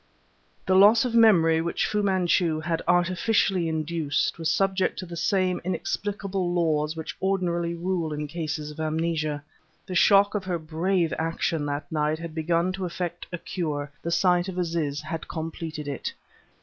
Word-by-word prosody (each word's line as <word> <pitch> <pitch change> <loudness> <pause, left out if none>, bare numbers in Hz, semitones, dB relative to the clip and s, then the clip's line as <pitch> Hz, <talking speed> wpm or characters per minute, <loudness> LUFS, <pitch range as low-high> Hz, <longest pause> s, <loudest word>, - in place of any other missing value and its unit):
The 185 - +2
loss 210 +5 +7
of 245 - -2
memory 170 -9 +5
which 170 +1 -1
Fu 210 - 0
Manchu 180 -4 +2
had 165 +1 -2
artificially 180 +1 +2
induced 160 0 -1
was 165 -1 0
subject 195 +2 +1
to 185 - -5
the 170 -1 -8
same 185 +1 +1
inexplicable 195 0 -2
laws 155 -3 +1
which 160 -1 -6
ordinarily 175 -3 0
rule 170 -2 -2
in 150 0 -3
cases 155 -1 -4
of 150 - -12
amnesia. 155 -2 -1 0.4
The 185 - -6
shock 200 +3 +5
of 210 -2 -2
her 180 -2 -1
brave 165 +2 0
action 160 -1 -1
that 145 0 -4
night 155 0 0
had 165 0 -7
begun 170 +3 0
to 190 -1 -3
effect 175 0 -4
a 175 - -3
cure; 150 -5 -4
the 170 - -3
sight 180 +1 +3
of 185 -1 -6
Aziz 165 -5 -1
had 155 +1 -5
completed 160 -2 -5
it. 140 -2 -3
170 Hz, 160 wpm, -26 LUFS, 155-185 Hz, 0.4 s, loss